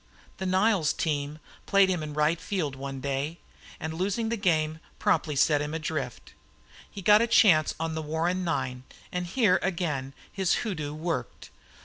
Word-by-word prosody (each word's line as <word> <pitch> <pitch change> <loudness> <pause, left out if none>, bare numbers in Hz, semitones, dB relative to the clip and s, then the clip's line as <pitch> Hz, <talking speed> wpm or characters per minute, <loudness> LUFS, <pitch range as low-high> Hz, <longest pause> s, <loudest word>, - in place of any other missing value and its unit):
The 190 - -3
Niles 190 -3 +3
team 150 -1 -2 0.3
played 195 -1 +5
him 180 -3 0
in 150 -1 -6
right 155 +2 +2
field 160 -9 -2
one 135 0 -6
day, 140 +4 -2 0.4
and, 160 0 -4
losing 200 +6 -1
the 235 - 0
game, 160 -6 +1 0.2
promptly 150 -3 +1
set 145 +1 +3
him 150 +2 -3
adrift. 150 -6 -4 0.6
He 200 - -9
got 210 +3 +7
a 235 - +2
chance 170 -9 +5
on 165 0 -2
the 160 - -3
Warren 165 +4 -1
nine 130 -7 -2 0.3
and 180 -1 -2
here 190 -2 +3
again 150 -8 -2 0.2
his 190 -3 +1
hoodoo 150 -8 -3
worked. 165 +1 -4
160 Hz, 160 wpm, -27 LUFS, 150-185 Hz, 0.6 s, got